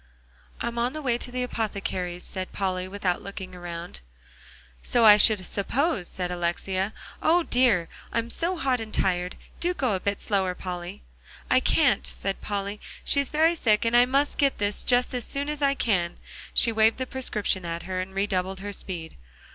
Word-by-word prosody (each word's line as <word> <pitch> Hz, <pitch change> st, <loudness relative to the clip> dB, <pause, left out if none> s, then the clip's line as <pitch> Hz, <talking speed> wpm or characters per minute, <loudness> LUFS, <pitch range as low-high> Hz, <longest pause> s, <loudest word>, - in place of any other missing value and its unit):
"I'm 235 Hz, 0 st, -2 dB
on 245 Hz, +2 st, 0 dB
the 310 Hz, -, -5 dB
way 240 Hz, -3 st, +1 dB
to -, -, -5 dB
the 250 Hz, 0 st, -2 dB
apothecary's," 195 Hz, -6 st, -3 dB
said 185 Hz, -1 st, -5 dB
Polly, 185 Hz, -2 st, -2 dB
without 185 Hz, -2 st, -1 dB
looking 190 Hz, -2 st, -7 dB
around. 175 Hz, -, -7 dB, 0.8 s
"So 235 Hz, -, +3 dB
I 210 Hz, -1 st, +10 dB
should 210 Hz, -2 st, +4 dB
suppose," 220 Hz, -, -1 dB
said 180 Hz, -1 st, -4 dB
Alexia; 185 Hz, +3 st, -1 dB, 0.3 s
"O, 340 Hz, +2 st, +4 dB
dear! 240 Hz, -, +3 dB, 0.2 s
I'm 230 Hz, +1 st, -1 dB
so 355 Hz, +2 st, -1 dB
hot 265 Hz, -4 st, +1 dB
and 220 Hz, -1 st, -6 dB
tired. 180 Hz, -2 st, 0 dB, 0.2 s
Do 355 Hz, +1 st, 0 dB
go 255 Hz, -9 st, 0 dB
a 190 Hz, -, 0 dB
bit 200 Hz, +1 st, -2 dB
slower, 190 Hz, -3 st, 0 dB
Polly." 175 Hz, -, -6 dB, 0.5 s
"I -, -, +6 dB
can't," -, -, +3 dB
said 195 Hz, 0 st, -3 dB
Polly. 200 Hz, 0 st, -3 dB, 0.2 s
"She's 280 Hz, -2 st, +3 dB
very 320 Hz, +2 st, +3 dB
sick, 225 Hz, -9 st, +2 dB
and 230 Hz, +1 st, +2 dB
I 245 Hz, +1 st, +6 dB
must 275 Hz, +3 st, +1 dB
get 280 Hz, -2 st, +3 dB
this 205 Hz, 0 st, 0 dB
just 245 Hz, 0 st, +2 dB
as 250 Hz, -1 st, -2 dB
soon 280 Hz, +4 st, -2 dB
as 300 Hz, -1 st, -3 dB
I 280 Hz, 0 st, +3 dB
can." 180 Hz, -9 st, 0 dB, 0.3 s
She 230 Hz, -, +4 dB
waved 220 Hz, 0 st, +3 dB
the 260 Hz, -, -2 dB
prescription 210 Hz, -7 st, -1 dB
at 170 Hz, 0 st, -4 dB
her, 185 Hz, 0 st, -2 dB
and 190 Hz, +1 st, -7 dB
redoubled 190 Hz, -1 st, -1 dB
her 205 Hz, 0 st, -5 dB
speed. 170 Hz, -4 st, -6 dB
205 Hz, 180 wpm, -26 LUFS, 185-250 Hz, 0.8 s, I